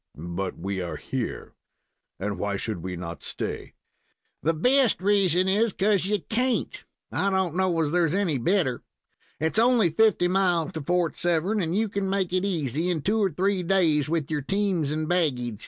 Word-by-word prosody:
"But 85 +4 -4
we 95 +2 -3
are 85 - -4
here, - - -5 0.7
and 100 0 -3
why 100 +1 -1
should 100 -2 -4
we 90 +1 -5
not 85 -1 -7
stay?" - - -5 0.7
"The 165 +1 +1
best 250 - +3
reason 190 -2 +2
is 210 +2 +2
'cause 195 -2 +1
you 205 -2 0
can't. 250 +2 -1 0.3
I 200 - +1
don't 190 -4 0
know 185 -3 +1
as 150 -2 0
there's 170 -1 +2
any 175 -9 0
better. 145 -3 +1 0.6
It's 160 +7 0
only 230 -7 +4
fifty 200 0 +3
miles 180 -4 +1
to 160 - -5
Fort 175 +2 0
Severn, 175 +5 +1
and 170 +2 -1
you 220 +1 +1
can 200 -1 -2
make 190 -2 -1
it 185 0 +1
easy 165 -3 -1
in 165 -5 -1
two 215 +3 +1
or 195 - +2
three 190 +3 0
days 165 -5 +2
with 160 -3 -1
your 150 -1 -1
teams 185 -2 0
and 155 0 -2
baggage. 125 - 0
175 Hz, 180 wpm, -25 LUFS, 150-195 Hz, 0.7 s, only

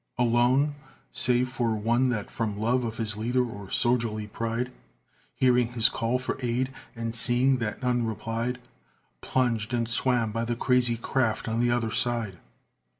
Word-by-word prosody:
Alone? 125 +4 +3 0.4
Save 125 +1 +2
for 120 -4 0
one 120 +4 +2
that 105 -5 -3
from 105 -3 -2
love 120 +4 +1
of 115 -1 -4
his 110 -2 -2
leader 125 +3 +1
or 100 -4 -9
soldierly 115 -3 +1
pride 115 +3 -3 0.6
(Hearing 125 -2 +3
his 115 -1 +4
call 115 +2 0
for 130 +1 -4
aid, 125 +2 -1 0.2
and 115 -1 -3
seeing 125 +3 +3
that 115 +1 -4
none 120 -2 +1
replied), 115 +3 -3 0.6
Plunged 120 -3 0
and 115 -1 0
swam 120 -1 +2
by 115 +1 -2
the 120 +1 -1
crazy 120 -1 +2
craft 115 -1 0
on 115 +1 -1
the 120 0 +2
other 120 -2 0
side. 115 -7 -1
120 Hz, 155 wpm, -27 LUFS, 115-125 Hz, 0.6 s, his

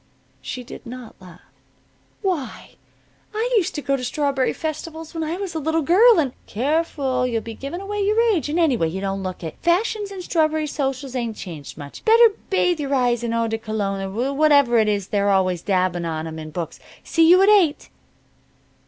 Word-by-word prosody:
She 250 - -6
did - - -10
not 245 -1 -9
laugh. 180 -1 -14 0.8
"Why, 325 - -3 0.6
I 470 +3 -1
used 395 -7 +1
to 295 - -4
go 275 - +1
to 260 - -5
strawberry 275 0 0
festivals 320 0 -6
when 325 -1 -3
I 320 +3 -3
was 385 -4 -5
a 320 - -2
little 320 +1 0
girl 425 - +6
in 280 -6 +1
" - - -34
"Careful! 270 0 0
You'll 230 -2 -2
be 230 - -7
giving 280 - -6
away 410 +1 -3
your 420 +3 +2
age, 310 -6 -1
and, 320 +4 0
anyway, 255 - +2
you 185 +4 -4
don't 195 0 -3
look 185 -1 -6
it. 160 - -6
Fashions 410 +4 +1
in 380 -2 -7
strawberry 315 -2 +1
socials 270 -2 -3
ain't 235 -3 -2
changed 160 -8 -8
much. 145 -2 -10
Better 460 +1 +7 0.2
bathe 360 -3 +2
your 280 -1 -1
eyes 245 -2 +1
in 235 - -1
eau 230 0 0
de 225 0 -2
cologne 210 -3 -2
or 225 +8 -2
whatever 285 -5 +4
it 215 - +3
is 200 -2 -1
they're 200 -2 +1
always 185 -3 +2
dabbing 180 -3 0
on 160 -1 -3
'em 160 0 -6
in 155 0 -7
books. 165 0 -6 0.2
See 325 0 +3
you 365 +2 +7
at 400 - +5
eight." 375 -8 +3
270 Hz, 200 wpm, -22 LUFS, 205-330 Hz, 0.8 s, Better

